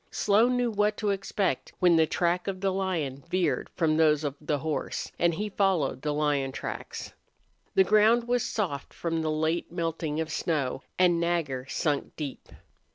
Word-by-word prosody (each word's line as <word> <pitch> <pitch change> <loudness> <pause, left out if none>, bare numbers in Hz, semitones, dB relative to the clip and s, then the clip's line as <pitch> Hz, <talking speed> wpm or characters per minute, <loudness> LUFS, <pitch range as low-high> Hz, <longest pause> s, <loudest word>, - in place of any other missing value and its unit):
Slone 225 +5 +3
knew 245 -1 +1
what 210 0 +1
to 210 -2 0
expect 195 0 -1
when 180 -2 +5
the 160 -1 +4
track 175 +3 0
of 190 -1 -3
the 195 0 0
lion 165 -8 -2
veered 185 -1 0
from 160 -3 +2
those 155 -1 +4
of 145 -2 -1
the 150 0 0
horse, 155 +2 -3
and 170 0 +4
he 210 +5 -2
followed 190 -10 +1
the 150 - -1
lion 145 -2 0
tracks. - - -6 0.6
The 190 - +7
ground 215 +4 +4
was 245 -1 +1
soft 170 -11 -3
from 165 -1 -2
the 160 - -1
late 160 +3 -1
melting 165 -3 -2
of 160 0 -2
snow, 140 -6 -1 0.2
and 175 -2 +4
Nagger 160 -7 -1
sunk 145 -2 -1
deep. 145 -4 -6
170 Hz, 170 wpm, -28 LUFS, 150-195 Hz, 0.6 s, The